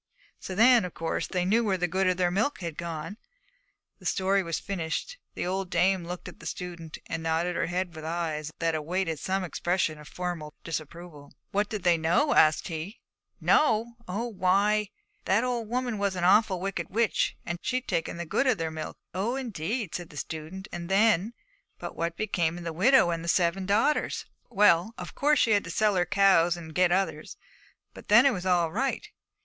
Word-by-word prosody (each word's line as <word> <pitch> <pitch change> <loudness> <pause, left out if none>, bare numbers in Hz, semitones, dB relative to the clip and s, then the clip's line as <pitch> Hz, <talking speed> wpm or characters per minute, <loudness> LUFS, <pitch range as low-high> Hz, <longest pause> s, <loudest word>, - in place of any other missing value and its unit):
So 185 - -6
then, 235 +2 +6
of 180 - -6
course 165 0 -2
they 180 -1 -1
knew 225 +5 +3
where 195 -4 +1
the 180 0 0
good 190 +2 0
of 185 -1 +2
their 180 -1 +2
milk 215 +6 0
had 170 -3 -4
gone.' 170 +4 -5 0.8
The - - -5
story 195 +1 +2
was 165 -3 -2
finished. 195 - -4 0.2
The - - -3
old 190 +1 -2
dame 185 -1 +2
looked 180 +1 -6
at 180 - -11
the 165 - -8
student 170 -3 -6
and 165 - -4
nodded 165 +2 0
her - - 0
head 175 -1 -2
with 155 - -8
eyes 160 -2 -3
that 165 -1 0
awaited 165 +1 -2
some 190 +4 -1
expression 175 -2 -1
of 150 - -12
formal 175 -4 -5
disapproval. 160 -2 -7 0.2
'What 205 +1 0
did 210 -4 -4
they 175 -2 +4
know?' 175 - +2
asked 155 -1 +4
he. 165 +6 -6 0.4
'Know! 235 -5 +3
Oh, 205 +6 -2
why, 205 +1 +2 0.4
that 195 +4 +3
the - - -1
old 240 -3 -2
woman 245 -2 -2
was 200 -2 0
an 180 - -3
awful 190 0 +4
wicked 185 -3 -3
witch, 225 +2 +1
and 175 0 -4
she'd 255 0 -2
taken 165 0 -2
the 170 - -4
good 270 - +1
of 250 -5 +3
their 165 -1 -2
milk.' 160 0 -6 0.2
'Oh, 205 +7 -1
indeed!' 225 - -3
said 175 -2 -5
the 150 - -12
student; 160 +7 -6
and 170 -1 -6
then, 210 +2 +3 0.4
'But - - -7
what 170 0 -3
became 175 -6 0
of 175 - -8
the 165 -1 -4
widow 205 +2 +5
and 165 -1 -3
the - - -6
seven 180 +2 +1
daughters?' 225 +9 +1 0.2
'Well, 205 -1 +3
of - - -7
course 295 +2 +2
she 230 - +3
had 205 -1 +3
to - - -7
sell 210 +3 +2
her 175 -1 +1
cows 175 -4 +4
and 160 -2 -9
get 180 +1 +3
others, 190 +2 -1 0.6
and - - -11
then 235 +5 +7
it 275 - +5
was 185 -2 -4
all 175 -3 +2
right. 265 +8 -1
180 Hz, 200 wpm, -27 LUFS, 170-210 Hz, 0.8 s, then